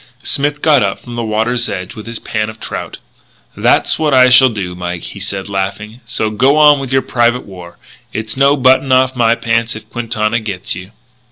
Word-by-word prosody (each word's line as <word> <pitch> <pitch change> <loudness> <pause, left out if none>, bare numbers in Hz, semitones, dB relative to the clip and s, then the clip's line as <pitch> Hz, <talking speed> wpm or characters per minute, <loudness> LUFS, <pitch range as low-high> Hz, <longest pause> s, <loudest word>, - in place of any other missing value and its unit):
Smith 145 +1 -1
got 150 -4 +4
up 100 -1 -1
from 120 -1 -10
the 120 - -3
water's 115 +3 0
edge 90 0 -6
with 110 +1 -10
his 115 0 -4
pan 110 0 -3
of 110 0 -11
trout: - - -6 0.6
"That's - - +2
what 150 -3 +2
I 130 0 +6
shall 130 +1 +7
do, 100 -6 -5
Mike," 90 -1 -5
he - - -8
said, 100 -1 -4
laughing. 100 +4 -4
"So 110 -1 -1
go 130 +7 +2
on 150 -2 +6
with 135 -2 -6
your 135 0 +2
private 120 0 0
war; 90 -3 -12 0.3
it's 110 0 -4
no 140 +1 +3
button 130 0 +3
off 130 0 +3
my 115 -1 +3
pants 115 0 -1
if 110 0 -10
Quintana 115 -1 -1
gets 100 -4 -4
you." 90 +2 -8
115 Hz, 200 wpm, -15 LUFS, 105-130 Hz, 0.6 s, shall